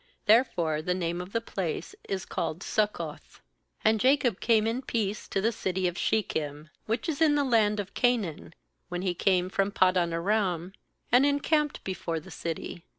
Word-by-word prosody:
Therefore 195 -9 +3
the 180 +3 -1
name 175 -1 -2
of 180 +2 -9
the 230 - +1
place 190 -7 -4 0.2
is 190 -1 -2
called 165 +1 -3
bSuccoth. 210 +1 -2 0.5
18And 220 +1 +5
Jacob 255 -4 +3
came 220 -2 +3
in 230 +3 -1
peace 215 -5 -2
to - - -1
the 225 +3 +2
city 190 -4 -1
of 175 - -3
Shechem, 155 -8 -1 0.2
which 225 +9 -1
is 320 -2 -2
in 305 -2 +5
the 290 - +2
land 220 -5 +3
of 195 -2 -5
Canaan, 220 - 0 0.3
when 180 0 -3
he 185 -2 0
came 180 0 +2
from 195 +1 0
Paddan 185 -3 +3
aram; 180 0 0 0.4
and 245 +3 +6
encamped 290 +1 +1
before 170 -3 -3
the 155 - -13
city. 170 +1 -5
195 Hz, 170 wpm, -28 LUFS, 175-230 Hz, 0.5 s, and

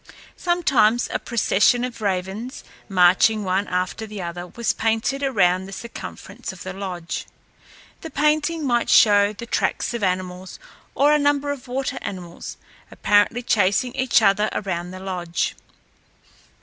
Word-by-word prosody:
Sometimes 250 -10 +2
a - - 0
procession 235 +1 +2
of 250 -3 -5
ravens, 200 +5 -3 0.3
marching 190 +3 +4
one 190 +2 0
after 185 +4 -2
the 210 -1 -8
other, 175 0 -5
was 235 +5 -1
painted 225 +5 0
around 190 -9 +2
the - - -10
circumference 235 +2 -8
of 190 - -11
the 185 - -6
lodge. 185 -3 -5 0.7
The 325 - -7
painting 300 +2 +1
might 240 -2 +1
show 205 -1 +6
the 225 +3 -8
tracks 240 - -1
of 235 - -3
animals, 185 -1 -3 0.4
or 290 +2 +4
a 300 - +4
number 285 0 +1
of 275 -3 -7
water 260 +1 -3
animals, 175 -3 -7 0.3
apparently 205 +4 +2
chasing 205 +4 +2
each 260 -3 +2
other 210 +1 +3
around 175 -3 -3
the 185 +1 -8
lodge. 180 -3 -2
210 Hz, 140 wpm, -22 LUFS, 185-250 Hz, 0.7 s, show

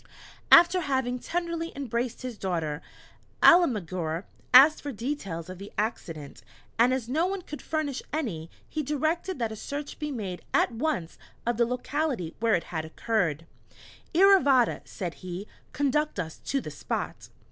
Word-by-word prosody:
After 350 +2 +8
having 260 -4 -1
tenderly 335 +2 -3
embraced 245 -3 -3
his 250 -2 -4
daughter, 165 -7 -2 0.6
Alemguir 185 - +4 0.3
asked 275 +5 +8
for 290 - -4
details 210 - -4
of 185 0 -8
the 200 +1 -9
accident, 165 - -4 0.4
and 240 +2 +6
as 255 -3 -1
no 315 +8 +1
one 385 -1 -3
could 300 - -8
furnish 300 -4 -2
any, 200 - -3 0.2
he 310 - -3
directed 315 +6 -1
that 230 -3 -1
a - - -5
search 285 +6 -6
be 300 0 -3
made 200 -10 -4
at - - +3
once 230 - -2 0.3
of 240 0 0
the 235 -1 +3
locality 250 - -2
where 225 0 +3
it 170 - -1
had 160 -1 -1
occurred. 165 -2 -1 0.7
"Iravata," 295 - +5
said 175 -4 -5
he, 185 +2 -6 0.2
"conduct 285 -2 0
us 160 -3 -4
to 275 - 0
the - - -7
spot." - - -4
245 Hz, 150 wpm, -27 LUFS, 185-300 Hz, 0.7 s, After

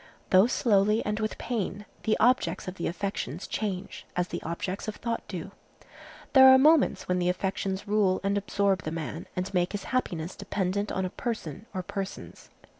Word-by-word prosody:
Though 190 +4 +7
slowly 210 -3 +2
and 210 +1 -1
with 215 0 -2
pain, 210 -3 -3 0.2
the 215 - +2
objects 245 -3 +2
of 185 - -3
the 175 - -3
affections 180 -3 -3
change, 200 -3 -4
as 180 0 0
the - - -4
objects 180 +5 -4
of 215 - -3
thought 230 -1 -3
do. 185 0 -6 0.8
There 265 -1 +9
are 260 0 +9
moments 300 +2 +4
when 180 0 +1
the 175 0 +1
affections 190 +1 -2
rule 200 -3 +2
and 200 +1 +1
absorb 200 -2 +1
the 155 - -4
man 160 0 -5
and 185 +2 -3
make 180 +1 +1
his 205 - -3
happiness 175 -9 -1
dependent 200 +1 -2
on 190 - -1
a 180 - -4
person 215 - -5
or 185 -2 -4
persons. 195 +1 -6
195 Hz, 180 wpm, -28 LUFS, 180-215 Hz, 0.8 s, There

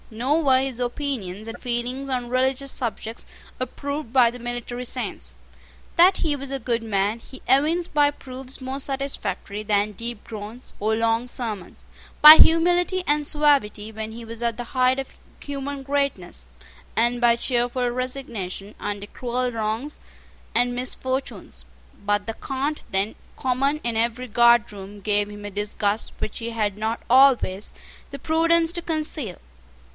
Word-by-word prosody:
Nor 260 +9 0
were 260 -2 +5
his 265 -3 -3
opinions 240 -6 -3
and 225 +1 -6
feelings 250 +2 -3
on 250 -2 -2
religious 260 +2 0
subjects 225 -1 -4 0.4
approved 280 0 -4
by 245 -2 +5
the 245 - -10
military 240 +1 -5
saints. 245 - -3 0.6
That 365 +3 +6
he 305 -3 +1
was 275 -1 -6
a 275 - -2
good 230 -1 -1
man 205 +1 0
he 260 +3 -13
evinced 310 +7 +2
by 290 -1 +5
proofs 260 -1 -7
more 265 +1 -4
satisfactory 270 -6 -2
than 210 0 +1
deep 230 +2 -6
groans 220 +3 -9
or 220 +2 +1
long 230 +2 +1
sermons, 220 -7 -6 0.3
by 305 +1 +13
humility 355 +3 +4
and 295 0 +2
suavity 280 -9 +2
when 220 0 -6
he 230 +1 -9
was 230 +1 -7
at 235 -2 0
the 245 - -3
height 255 0 +4
of 270 -1 -6 0.2
human 280 -1 -5
greatness, 270 - -2 0.5
and 240 +2 +2
by 235 -1 +5
cheerful 245 +1 0
resignation 240 -6 -4
under 205 0 -4
cruel 250 +2 -2
wrongs 225 +6 -3 0.6
and 245 +1 +2
misfortunes: 250 - -3 0.4
but 205 0 +1
the 225 - -3
cant 275 +5 -3
then 195 +3 0 0.2
common 270 +3 +1
in 235 -1 -1
every 235 +2 0
guardroom 210 -4 +2
gave 205 0 0
him 205 0 -9
a 205 - -5
disgust 205 +1 -1
which 215 - -4
he 230 0 -4
had 215 -3 -1
not 220 +2 -2
always 250 -7 +4 0.4
the 280 - -8
prudence 330 +2 +3
to 345 - -3
conceal. 310 - -2
245 Hz, 150 wpm, -24 LUFS, 220-275 Hz, 0.6 s, by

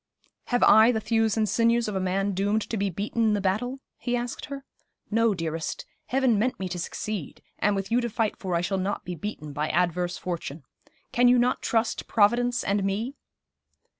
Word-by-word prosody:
'Have 245 -1 +1
I 220 +3 +7
the 220 - 0
thews 225 0 +1
and 215 -1 +2
sinews 230 +1 +2
of 210 - -3
a - - +1
man 195 +2 0
doomed 205 +3 0
to - - 0
be 200 -1 0
beaten 205 +5 -3
in 220 -1 +3
the - - 0
battle?' 220 +8 -1 0.2
he 245 -1 -1
asked 240 0 -4
her. 275 0 -7 0.5
'No, 225 -1 +3
dearest; 165 -2 -4 0.2
Heaven 255 -5 +2
meant 245 +4 0
me 190 - -2
to 180 - -4
succeed; 195 -1 -5 0.2
and 205 0 +2
with 195 +1 -3
you 240 +2 +3
to 240 - -2
fight 220 -1 0
for 185 -3 -2
I 170 - +1
shall 190 +2 -1
not 195 +2 -2
be 180 - -4
beaten 155 -4 -6
by 150 +2 -1
adverse 175 0 0
fortune. 165 -4 -5 0.5
Can 245 +1 +4
you 250 +1 +6
not 245 +1 +2
trust 225 0 0
Providence 240 +3 +3
and 200 0 0
me?' 210 +7 -1
210 Hz, 200 wpm, -26 LUFS, 190-235 Hz, 0.5 s, I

